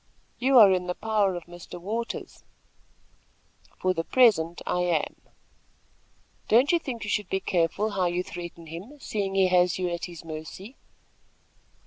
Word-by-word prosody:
"You 265 +1 +4
are 210 -5 +9
in 180 -1 0
the 180 - -2
power 210 -4 +1
of 175 - -6
Mr. 175 0 -11
Waters." 225 +6 -5 1.3
"For 185 0 +1
the 165 -2 -2
present 180 -8 +3
I 180 - 0
am." 175 -4 -1 1.3
"Don't 245 +6 +5
you 345 - +3
think 245 -8 -6
you 210 - -5
should 210 -3 -1
be 190 - 0
careful 185 +4 0
how 190 -3 +1
you 175 +1 -1
threaten 175 -2 -8
him, 185 - -9
seeing 200 -6 -3
he 190 -1 +4
has 180 -1 +3
you 180 -1 -1
at 170 0 -3
his 170 -2 -10
mercy." 160 - -8
185 Hz, 155 wpm, -26 LUFS, 175-215 Hz, 1.3 s, are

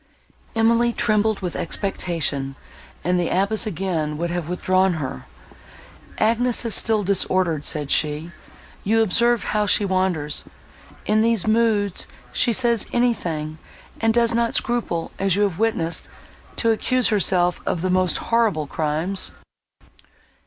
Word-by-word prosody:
Emily 230 +1 +3
trembled 215 -1 +1
with 180 -2 -4
expectation, 165 -8 -2 0.5
and 180 +1 +1
the 175 - 0
abbess 200 +4 +1
again 160 -5 -2
would 170 +2 -2
have 175 -2 -3
withdrawn 185 +1 +1
her. 140 - -6 0.9
"Agnes 235 +2 +2
is 230 - +1
still 215 -2 +3
disordered," 185 -5 +1
said 150 -2 0
she, 155 +2 0 0.5
"you 225 +2 +3
observe 235 +3 +2
how 210 -1 0
she 205 - +3
wanders. 185 -6 -1 0.6
In 215 +1 +2
these 225 -4 +2
moods 215 -3 +1 0.3
she 240 - +3
says 235 -2 +2
anything, 165 -11 -1 0.4
and 225 0 +2
does 235 0 +2
not 235 0 0
scruple, 235 -9 -1
as 195 -2 +1
you 205 - +2
have 195 -5 -1
witnessed, 215 -7 -1 0.5
to 230 - +2
accuse 255 +3 +2
herself 185 -4 +2
of 170 - -1
the 185 - 0
most 185 -1 +2
horrible 225 -10 0
crimes." 160 +6 -2
195 Hz, 130 wpm, -22 LUFS, 170-225 Hz, 0.9 s, Emily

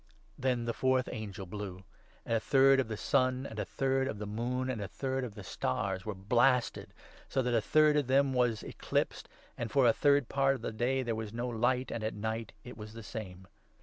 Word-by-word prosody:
Then 125 -3 0
the 115 - -1
fourth 130 0 +2
angel 100 -4 -6
blew; 95 -1 -7 0.4
and - - -2
a - - 0
third 135 +3 +5
of 130 - +1
the 110 -1 -4
sun 130 +1 +1
and 110 -4 -6
a - - -1
12 - - -28
third 135 0 0
of 110 - -3
the 105 - -5
moon 120 +5 -2
and 125 -5 -2
a 100 - -3
third 130 +4 -2
of 115 -5 -6
the 105 - -8
stars 95 +5 -2
were 105 - -3
blasted, 120 +6 +2 0.4
so 130 - +1
that 120 0 0
a 115 - +3
third 155 +5 +4
of 145 -4 +1
them 135 +1 +3
was 120 -3 +1
eclipsed, - - -2 0.3
and 115 - -2
for 135 +1 +3
a 115 - +6
third 140 -1 +3
part 135 0 +2
of 120 - -9
the - - -2
day 125 +4 0
there 120 -2 -1
was 110 -1 -4
no 120 +2 -2
light, 125 +2 0
and 115 - -3
at 110 - -2
night 110 +1 -3
it 125 -2 -10
was 105 0 -9
the 115 0 -9
same. 95 -4 -7
120 Hz, 230 wpm, -32 LUFS, 110-130 Hz, 0.4 s, a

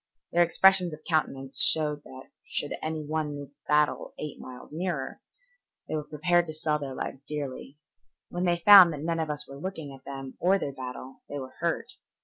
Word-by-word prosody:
Their 175 - +3
expressions 180 0 +5
of 155 - -22
countenance 135 -4 0
showed 150 -2 +3
that 130 0 -12 0.2
should 145 - -3
any 155 -1 -3
one 150 -1 -2
move 145 -1 -8
the 145 - -38
battle 150 0 +1
eight 150 -2 -6
miles 125 +3 -11
nearer, 160 -5 -3 0.7
they - - -5
were 155 -1 -1
prepared 170 +3 +1
to 155 - -5
sell 155 -1 0
their 135 -2 -5
lives 135 - -5
dearly. 145 -1 -5 0.5
When 175 +1 -2
they 175 -1 +2
found 185 -1 +9
that 145 0 -6
none 165 0 -1
of 160 -1 -2
us 150 0 -3
were 140 0 -10
looking 160 -7 -5
at 135 0 -14
them 135 -1 -8
or 190 +3 +4
their 140 -7 -4
battle, 130 0 -8
they 145 - -4
were 130 -2 -7
hurt. 175 +8 -1
150 Hz, 195 wpm, -28 LUFS, 140-170 Hz, 0.7 s, found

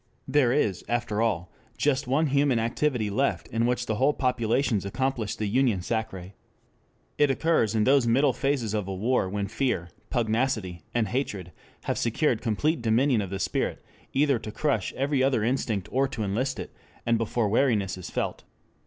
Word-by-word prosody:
There 135 -3 +3
is, 110 -9 +1
after 120 -3 -1
all, 95 -6 0 0.3
just 140 -2 +1
one 140 +5 +2
human 140 -3 +2
activity 115 -1 0
left 135 +7 0
in 115 +1 +1
which 125 0 0
whole 125 +6 +2
populations 125 -3 +1
accomplish 120 +1 -2
the 110 - -3
union 115 -2 +2
sacrée. 95 -3 -3 0.9
It 145 -1 +5
occurs 135 -6 +2
in 110 - +3
those 135 0 +4
middle 130 +3 +3
phases 135 -7 -1
of 105 -3 -1
a 95 - -3
war 110 0 +1
when 100 0 -2
fear, 115 -6 -1 0.2
pugnacity, 110 -6 0
and 115 -4 0
hatred 100 -8 -3 0.3
have - - -1
secured 120 +1 +1
complete 125 +6 0
dominion 115 +1 +3
of 100 - -4
the 95 - -3
spirit, 95 - -2 0.3
either 140 -3 +2
to 110 - -7
crush 145 +5 0
every 140 0 0
other 130 -5 +2
instinct 110 -5 -1
or 135 +2 +2
to 115 -4 -4
enlist 120 +7 -1
it, - - -7 0.3
and 115 -1 +2
before 115 0 0
weariness 105 -4 +2
is 90 -2 -8
felt. - - -3
120 Hz, 170 wpm, -27 LUFS, 105-135 Hz, 0.9 s, It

